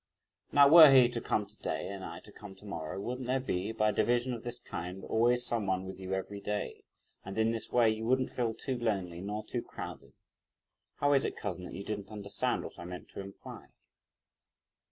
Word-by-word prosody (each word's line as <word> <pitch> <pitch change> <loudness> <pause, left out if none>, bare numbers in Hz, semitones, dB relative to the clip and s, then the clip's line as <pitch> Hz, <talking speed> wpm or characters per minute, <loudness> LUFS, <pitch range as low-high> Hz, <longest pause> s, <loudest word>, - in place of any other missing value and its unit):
Now 140 -1 +7
were 160 0 +11
he 130 -3 +8
to 120 -1 -4
come 105 - 0
to 100 +1 -12
day, - - -3
and 100 -1 -6
I 85 0 -7
to 105 - -15
come 100 -1 -11
to 95 - -17
morrow, 80 -3 -5
wouldn't 125 +4 -4
there 130 +1 +2
be, 100 -5 -2
by 110 -1 +2
a - - 0
division 120 +4 +1
of 115 - -6
this 120 0 -3
kind, 90 -3 -6
always 120 +2 +2
some 115 -5 0
one 95 0 0
with 95 0 -8
you 95 0 -3
every 100 +2 -4
day? 105 0 -4 0.4
and 95 +2 -7
in 110 0 +3
this 115 -1 -4
way, 120 -2 +5
you 110 +1 -3
wouldn't 130 +1 +2
feel 115 -3 -1
too 130 -3 -3
lonely, 95 -7 -1
nor 105 +2 -4
too - - -3
crowded. - - -9 0.8
How 145 0 +2
is 135 - +4
it, - - -3
cousin, 90 - -4
that - - -8
you 100 - -6
didn't 100 -1 -5
understand 100 -2 -1
what - - -9
I - - -7
meant 90 0 -8
to - - -9
imply?" 100 0 -9
105 Hz, 215 wpm, -31 LUFS, 95-120 Hz, 0.8 s, were